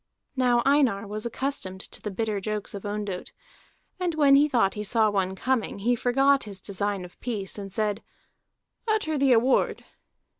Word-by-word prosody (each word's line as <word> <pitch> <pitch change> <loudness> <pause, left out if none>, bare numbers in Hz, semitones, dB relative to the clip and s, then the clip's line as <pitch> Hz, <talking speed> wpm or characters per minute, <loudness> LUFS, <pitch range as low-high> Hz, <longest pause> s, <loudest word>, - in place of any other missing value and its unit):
Now 245 -2 +3
Einar 270 -8 +3
was 215 +3 -4
accustomed 235 -7 -4
to - - -8
the 210 - -4
bitter 210 +1 -2
jokes 210 0 -3
of 200 0 -6
Ondott, 205 -3 -4 0.7
and 355 -3 -1
when 285 -3 +6
he 290 +2 +5
thought 230 -8 +2
he 210 - -4
saw 215 0 +2
one 190 -2 0
coming, 255 0 -1
he 230 +5 +1
forgot 270 +3 +3
his 200 -3 -8
design 200 0 -3
of 180 - -15
peace, 210 -6 -3
and 195 -1 -7
said: 210 +1 -1 0.9
"Utter 425 -8 +1
the 275 -2 +3
award." 245 +2 +2
220 Hz, 165 wpm, -26 LUFS, 200-265 Hz, 0.9 s, when